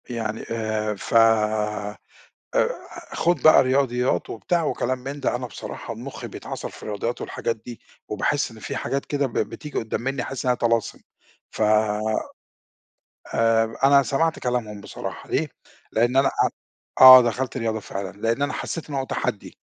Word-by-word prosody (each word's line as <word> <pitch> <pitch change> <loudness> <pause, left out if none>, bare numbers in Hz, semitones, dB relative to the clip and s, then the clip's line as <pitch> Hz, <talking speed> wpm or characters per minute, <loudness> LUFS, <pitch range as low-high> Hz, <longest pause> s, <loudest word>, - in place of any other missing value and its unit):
يعني 115 -2 -3
آآ 110 -2 -1
ف - - -7 1.4
أ - - +4 0.5
خُد 175 +1 +1
بقى 155 - +8
رياضيات 130 -1 +1
وبتاع 170 +9 -1
وكلام 130 -3 -1
من 135 +3 -7
ده، 130 - 0
أنا 125 0 -5
بصراحة 120 - -7
مُخّي - - -8
بَيتعَصَر - - -6
في - - -14
الرياضيات 110 +3 -3
والحاجات 115 - -3
دي، 115 +1 -11 0.3
وباحس 140 +7 0
إن 115 - -13
في 135 +5 -5
حاجات 135 +1 -2
كده 145 -1 0
ب 125 - -9
ب - - 0
بتيجي 150 - -6
قُدام 110 - -3
منّي 135 +1 -2
أحس 135 0 -5
إنّها 125 -1 +3
طلاسم، 115 -2 0 0.5
ف - - -4 1.7
آآ 115 0 +2
أنا 140 0 +6
سَمَعت 160 +4 0
كلامهُم 115 -4 -2
بصراحة 100 - -7
ليه؟ - - 0 0.4
لأن 120 +3 +2
أنا 135 0 +5
أ - - +1 0.5
آه 130 -1 +12
دَخَلت 125 +2 -2
رياضة 110 -3 -1
فعلًا، 95 -2 -6
لأن 115 +5 0
أنا 145 - 0
حسيت 165 -2 -5
إن - - -5
هو 135 -1 -1
تَحَدّي، - - -4
125 Hz, 160 wpm, -24 LUFS, 115-135 Hz, 1.7 s, آه